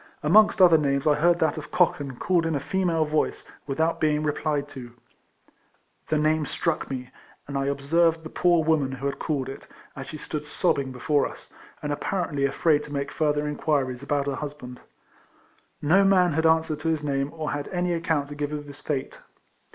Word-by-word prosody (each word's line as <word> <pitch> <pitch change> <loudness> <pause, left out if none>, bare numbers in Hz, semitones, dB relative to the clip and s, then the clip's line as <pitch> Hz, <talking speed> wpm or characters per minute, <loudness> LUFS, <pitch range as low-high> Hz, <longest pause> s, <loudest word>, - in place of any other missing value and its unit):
Amongst 210 +7 +5
other 175 -4 +7
names 140 -2 0
I 150 - +5
heard 170 +4 +3
that 160 -2 0
of 150 - -10
Cochan 145 -7 +1
called 175 +1 +1
in 160 - -1
a - - 0
female 165 +1 0
voice, 155 0 -1 0.2
without 160 +4 0
being 150 -1 +2
replied 145 -1 -1
to. 125 -4 -10 1.1
The 155 - +1
name 155 0 +1
struck - - -2
me, 125 -2 -5 0.4
and 140 - -6
I 135 0 0
observed 160 +4 +1
the 160 - -7
poor 175 -2 +3
woman 150 -4 +1
who 135 +1 -6
had 140 - -2
called 145 -5 -2
it, 135 - -9 0.3
as 135 - -7
she 155 - -7
stood 150 0 -5
sobbing 140 -2 0
before 145 +3 +1
us, - - -14 0.3
and 145 -1 -1
apparently 145 -4 -1
afraid 150 +2 +2
to 145 - -11
make 140 -1 -3
further 150 -1 0
inquiries 140 -4 -1
about 140 0 -1
her 140 - -1
husband. 140 -4 -7 1.0
No 180 +7 +5
man 185 -4 +4
had 160 +2 +2
answered 160 -1 +2
to 165 - -4
his 155 -2 -1
name, 140 -1 -1
or 155 -2 -4
had 145 0 -3
any 180 -1 -1
account 160 -4 -1
to 145 - -7
give 145 0 -3
of 150 -1 -5
his 145 -1 -10
fate. 140 -3 -4
150 Hz, 190 wpm, -25 LUFS, 140-160 Hz, 1.1 s, other